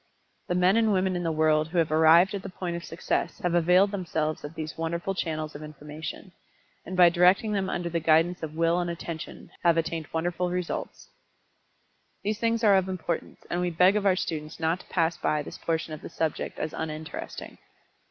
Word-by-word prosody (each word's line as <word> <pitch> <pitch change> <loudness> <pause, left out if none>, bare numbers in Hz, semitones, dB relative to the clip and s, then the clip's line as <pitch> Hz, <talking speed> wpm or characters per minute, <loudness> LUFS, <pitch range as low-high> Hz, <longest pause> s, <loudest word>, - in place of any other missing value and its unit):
The 180 - 0
men 180 +4 +4
and 220 -2 +3
women 185 -1 +1
in 175 - -1
the 165 -2 0
world 155 -1 +2
who 175 +2 -4
have 165 -2 +2
arrived 160 +4 +6
at 200 - -3
the 195 - -7
point 180 -1 -4
of 170 - -5
success 165 +1 -2
have 175 -1 +1
availed 180 +4 +4
themselves 160 -5 -2
of 145 +2 -8
these 155 -1 -5
wonderful 170 +3 -2
channels 155 -4 -3
of 145 - -9
information, 150 +3 -8 0.6
and 185 +1 -5
by 175 -1 +8
directing 180 +5 +4
them 195 -2 0
under 175 -1 -2
the 170 0 -1
guidance 165 +3 +3
of 155 -1 -6
Will 165 +1 +2
and 175 -1 -1
Attention, 170 -1 -7
have 170 -1 +4
attained 165 -1 -2
wonderful 175 +2 -1
results. 180 -1 -4 1.1
These 210 +1 -1
things 230 0 0
are 200 -3 +6
of 190 0 0
importance, 175 -2 -4
and 175 - -1
we 180 - +1
beg 180 +4 +4
of 205 -1 +1
our 190 - +4
students 155 -4 -4
not 165 +2 0
to - - -15
pass 165 -1 0
by 150 -1 0
this - - -9
portion 160 -1 -2
of 155 - -7
the - - -8
subject 160 -2 -3
as 155 - -3
uninteresting. 155 0 -6
170 Hz, 200 wpm, -27 LUFS, 160-185 Hz, 1.1 s, by